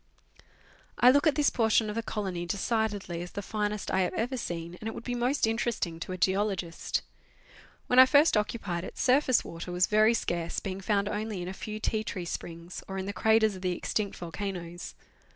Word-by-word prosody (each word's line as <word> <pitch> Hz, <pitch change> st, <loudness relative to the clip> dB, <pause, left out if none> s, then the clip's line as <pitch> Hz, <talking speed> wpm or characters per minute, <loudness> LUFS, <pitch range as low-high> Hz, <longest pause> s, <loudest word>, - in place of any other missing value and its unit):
I 250 Hz, -, +7 dB
look 285 Hz, +4 st, +4 dB
at 305 Hz, -, +3 dB
this 295 Hz, -2 st, +3 dB
portion 225 Hz, -2 st, +3 dB
of 210 Hz, -, -3 dB
the 230 Hz, -, 0 dB
colony 190 Hz, -6 st, -3 dB
decidedly 205 Hz, -3 st, -1 dB
as 175 Hz, -, -8 dB
the 200 Hz, -, -4 dB
finest 210 Hz, 0 st, -2 dB
I -, -, +2 dB
have 180 Hz, -, -1 dB
ever 245 Hz, +4 st, -1 dB
seen, 170 Hz, -7 st, -4 dB
and 220 Hz, -, -4 dB
it 225 Hz, -, -4 dB
would -, -, -7 dB
be 245 Hz, -, -3 dB
most 245 Hz, +3 st, +1 dB
interesting 225 Hz, -7 st, -1 dB
to 175 Hz, -, -5 dB
a 185 Hz, -, -3 dB
geologist. 190 Hz, -2 st, 0 dB, 0.8 s
When 250 Hz, -, +4 dB
I 260 Hz, -, +10 dB
first 290 Hz, +2 st, +5 dB
occupied 210 Hz, -5 st, -1 dB
it, -, -, -8 dB
surface 255 Hz, -1 st, +3 dB
water 170 Hz, +2 st, -7 dB
was 180 Hz, +1 st, +3 dB
very 215 Hz, +2 st, +4 dB
scarce, 170 Hz, -5 st, -2 dB
being 195 Hz, -1 st, -5 dB
found 200 Hz, +1 st, +1 dB
only 210 Hz, -3 st, -3 dB
in -, -, -6 dB
a 185 Hz, -, -4 dB
few 215 Hz, +2 st, -6 dB
tea 215 Hz, 0 st, -1 dB
tree 185 Hz, -5 st, -4 dB
springs, 170 Hz, +1 st, -6 dB
or 190 Hz, -, -5 dB
in 190 Hz, -, -3 dB
the 200 Hz, -, -4 dB
craters 220 Hz, -1 st, +3 dB
of 185 Hz, -, -9 dB
the 180 Hz, -1 st, 0 dB
extinct 205 Hz, -2 st, -2 dB
volcanoes. 175 Hz, 0 st, -6 dB
205 Hz, 205 wpm, -29 LUFS, 180-225 Hz, 0.8 s, I